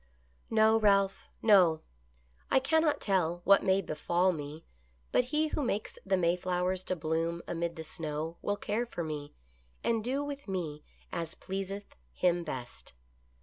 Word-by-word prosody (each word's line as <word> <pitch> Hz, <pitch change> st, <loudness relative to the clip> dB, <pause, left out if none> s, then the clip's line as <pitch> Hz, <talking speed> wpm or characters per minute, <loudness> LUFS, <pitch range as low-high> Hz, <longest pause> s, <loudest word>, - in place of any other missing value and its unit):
"No, 220 Hz, 0 st, +5 dB
Ralph, 200 Hz, -2 st, +2 dB
no! 180 Hz, -7 st, +6 dB, 0.7 s
I -, -, +4 dB
cannot 315 Hz, +2 st, +2 dB
tell 175 Hz, -3 st, +1 dB
what 200 Hz, +1 st, +6 dB
may 190 Hz, 0 st, +3 dB
befall 175 Hz, +4 st, +1 dB
me, 150 Hz, -1 st, -7 dB, 0.5 s
but 250 Hz, -, +3 dB
He 300 Hz, +4 st, +1 dB
who 300 Hz, -, -1 dB
makes 215 Hz, -5 st, -2 dB
the 190 Hz, -1 st, +2 dB
Mayflowers 180 Hz, +1 st, 0 dB
to 185 Hz, -, -1 dB
bloom 165 Hz, +1 st, -1 dB
amid 170 Hz, 0 st, -2 dB
the 160 Hz, -, -6 dB
snow 160 Hz, 0 st, -4 dB
will 205 Hz, 0 st, -1 dB
care 225 Hz, +5 st, -1 dB
for 175 Hz, -, -4 dB
me, 150 Hz, -2 st, -5 dB, 0.5 s
and 225 Hz, -2 st, +1 dB
do 265 Hz, +5 st, -1 dB
with 285 Hz, -2 st, -6 dB
me 165 Hz, -6 st, -3 dB, 0.3 s
as 165 Hz, -1 st, -4 dB
pleaseth 195 Hz, +1 st, -5 dB, 0.2 s
Him 175 Hz, -1 st, +2 dB
best. 125 Hz, -, -7 dB
185 Hz, 145 wpm, -31 LUFS, 165-210 Hz, 0.7 s, no